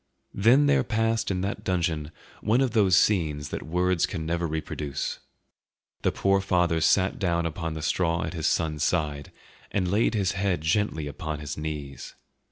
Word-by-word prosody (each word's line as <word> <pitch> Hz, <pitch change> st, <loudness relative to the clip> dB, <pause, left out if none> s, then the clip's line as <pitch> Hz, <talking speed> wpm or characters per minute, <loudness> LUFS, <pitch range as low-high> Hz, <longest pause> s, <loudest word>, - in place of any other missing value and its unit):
Then 120 Hz, +8 st, +5 dB
there 140 Hz, -2 st, +3 dB
passed 115 Hz, -1 st, 0 dB
in 90 Hz, -2 st, -1 dB
that 100 Hz, +2 st, -3 dB
dungeon 85 Hz, -4 st, -1 dB, 0.3 s
one 110 Hz, +4 st, +2 dB
of 135 Hz, -3 st, +2 dB
those 100 Hz, -5 st, +4 dB
scenes 75 Hz, -8 st, +2 dB
that -, -, -4 dB
words 90 Hz, +1 st, +1 dB
can 80 Hz, -5 st, -5 dB
never 85 Hz, +1 st, -1 dB
reproduce. 75 Hz, -3 st, -4 dB, 0.8 s
The -, -, +1 dB
poor 95 Hz, 0 st, +2 dB
father 90 Hz, -3 st, +1 dB
sat 95 Hz, +5 st, +2 dB
down 85 Hz, -3 st, 0 dB
on 80 Hz, 0 st, -3 dB
the 80 Hz, -, -5 dB
straw 85 Hz, +2 st, +1 dB
at -, -, -4 dB
his 80 Hz, -2 st, -1 dB
son's 75 Hz, -3 st, 0 dB
side 75 Hz, -4 st, -1 dB, 0.4 s
and 90 Hz, -3 st, 0 dB
laid 110 Hz, +3 st, +2 dB
his 100 Hz, -4 st, +1 dB
head 95 Hz, -4 st, -1 dB
gently 80 Hz, -1 st, 0 dB
upon 75 Hz, +1 st, -5 dB
his 75 Hz, -1 st, -5 dB
knees. 75 Hz, -3 st, -6 dB
85 Hz, 170 wpm, -26 LUFS, 80-100 Hz, 0.8 s, Then